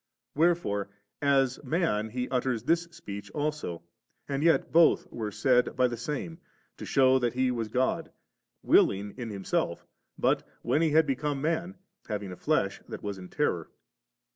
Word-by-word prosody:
Where 170 +4 +4
fore 100 - -3 0.3
as 135 -1 +2
man 130 - 0
He 125 +2 -3
utters 125 -3 0
this 170 +5 +2
speech 100 -11 -8
also, 150 - -3 0.4
and 140 0 -2
yet 165 +1 +3
both 170 0 +5
were 110 -3 -3
said 125 +4 +2
by 125 0 +4
the 120 - -3
Same, 150 +7 -5 0.4
to - - -7
shew 130 -1 +4
that 120 -1 -1
He 130 0 +2
was 115 -3 -2
God, 125 +4 0 0.5
willing 100 +1 +3
in 120 -3 -5
Himself, 100 -2 -2 0.3
but - - +2 0.2
when 155 - +2
He 165 - +3
had 160 +1 +4
become 140 +1 -1
man, 170 +5 -1 0.3
having 105 -3 -3
a - - -6
flesh - - 0
that - - -7
was 100 -2 -4
in 90 -1 -10
terror. - - -1
130 Hz, 165 wpm, -28 LUFS, 110-150 Hz, 0.5 s, both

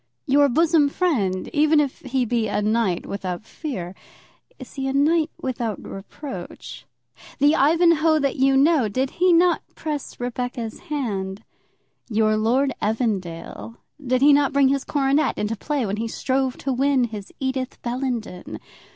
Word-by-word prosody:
Your 285 +1 +4
bosom 310 +1 +3
friend, 220 - 0
even 305 +1 +4
if 285 -3 -1
he 260 -1 -1
be 230 -1 0
a - - -1
knight 210 -4 0
without 190 0 -5
fear, 205 - -6 0.6
is - - -11
he 270 -1 -3
a 265 - -1
knight 310 +3 +3
without 235 -4 -3
reproach? 260 +8 -8 0.5
The 290 +1 +4
Ivanhoe 320 +1 +4
that 275 -3 0
you 270 0 +4
know, 280 -5 +4
did 260 +6 -1
he 365 0 +5
not 345 +1 +4
press 300 -3 -5
Rebecca's 245 -1 -4
hand? 205 -8 -3 0.7
Your 215 -1 +2
Lord 250 +5 +1
Evandale, 210 -2 -3 0.3
did 255 0 +1
he 290 0 +7
not 280 -1 +3
bring 280 -1 +4
his 275 0 0
coronet 285 +1 +1
into 210 +2 -1
play 280 +3 -2
when 200 0 -2
he 230 +1 -2
strove 260 +2 -1
to 270 - -2
win 270 0 +2
his 215 -4 -5
Edith 260 -1 -3
Bellenden? 240 -6 -4
260 Hz, 150 wpm, -23 LUFS, 220-285 Hz, 0.7 s, he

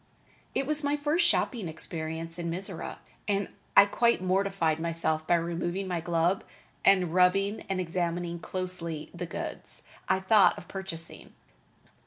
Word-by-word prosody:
It 275 - +1
was 300 +1 -1
my 285 +1 +1
first 310 +4 +2
shopping 235 - +1
experience 160 +1 -4
in 170 -1 -2
Mizora, 185 +1 -4 0.3
and 200 -1 0 0.3
I 200 - +11
quite 235 +3 +3
mortified 185 -4 +1
myself 160 -1 -1
by 175 - +5
removing 175 +3 -1
my 175 -2 -1
glove 170 +2 +1 0.4
and 185 -4 +4
rubbing 195 +3 +3
and 190 -1 0
examining 175 -1 -2
closely 170 -3 -3
the 175 0 -5
goods - - -6 0.3
I 190 - +4
thought 195 +2 +5
of - - -10
purchasing. 180 -4 -7
180 Hz, 140 wpm, -29 LUFS, 165-195 Hz, 0.4 s, I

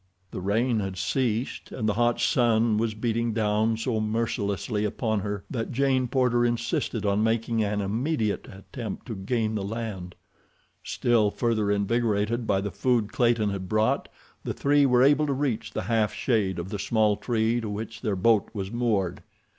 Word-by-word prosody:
The - - -5
rain 110 +5 +1
had 95 -2 -4
ceased, 115 +5 -1
and 110 -4 -2
the 105 - +2
hot 120 +2 +1
sun 115 -2 +3
was 110 -1 -1
beating 115 0 -1
down 110 +1 +1
so 115 -1 -1
mercilessly 105 -2 -1
upon 110 +1 -1
her 100 -1 -4
that 115 -4 -3
Jane 130 0 +1
Porter 125 -1 +2
insisted 120 -2 -1
on 100 +1 +2
making 115 0 +1
an 105 0 -1
immediate 110 +2 -1
attempt 100 +3 -7
to 115 - -5
gain 110 +3 -1
the 105 - -2
land. 100 -4 -5 0.7
Still 115 -4 +2
further 110 -2 0
invigorated 110 +2 0
by 95 -1 +2
the 100 0 -3
food 115 +1 0
Clayton 115 -4 +2
had 95 -2 -5
brought, 110 0 +1 0.3
the - - -3
three 145 0 +3
were 125 -1 +4
able 145 +2 +4
to 140 - +1
reach 135 -5 -1
the - - -3
half 110 -3 +1
shade 105 -7 0
of 85 +2 -5
the 105 -1 -4
small 110 0 +2
tree 115 +2 0
to 110 - -4
which 110 +2 -6
their 105 -5 -1
boat 105 +2 +3
was 95 -1 -4
moored. 110 -7 0
110 Hz, 170 wpm, -26 LUFS, 105-120 Hz, 0.7 s, were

